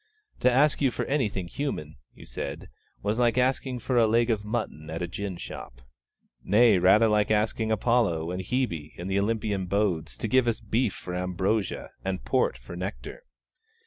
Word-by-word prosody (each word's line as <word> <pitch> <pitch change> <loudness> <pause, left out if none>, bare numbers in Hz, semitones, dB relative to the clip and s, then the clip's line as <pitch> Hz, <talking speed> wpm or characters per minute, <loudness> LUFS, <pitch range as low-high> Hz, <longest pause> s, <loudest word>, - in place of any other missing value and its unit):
'To 125 - +4
ask 140 +4 +3
you 135 - +4
for - - -3
anything 105 -10 -1
human,' 85 - -4 0.2
you - - -13
said, - - -6 0.3
'was 105 +3 0
like 120 -1 +3
asking 130 0 +1
for 125 +1 -1
a 115 - +5
leg 115 +2 +3
of 105 -2 -1
mutton 105 -8 -4
at 80 +2 -3
a - - -2
gin 95 +2 -5
shop.' - - -9 0.6
Nay, 105 0 +5
rather, 105 +5 +6
like 105 -1 +2
asking 110 +1 +1
Apollo 105 -7 +1
and 90 +1 -3
Hebe, 90 - -2
in 85 - -6
the 95 +1 +1
Olympian 105 -2 -1
abodes, 90 -5 -1
to - - -2
give 130 +2 +3
us 115 - +1
beef 110 0 0
for 90 - -7
ambrosia, 95 +3 -1
and 95 -9 -3
port - - +1
for 65 +7 -10
nectar. 95 - -6
105 Hz, 175 wpm, -27 LUFS, 90-120 Hz, 0.6 s, rather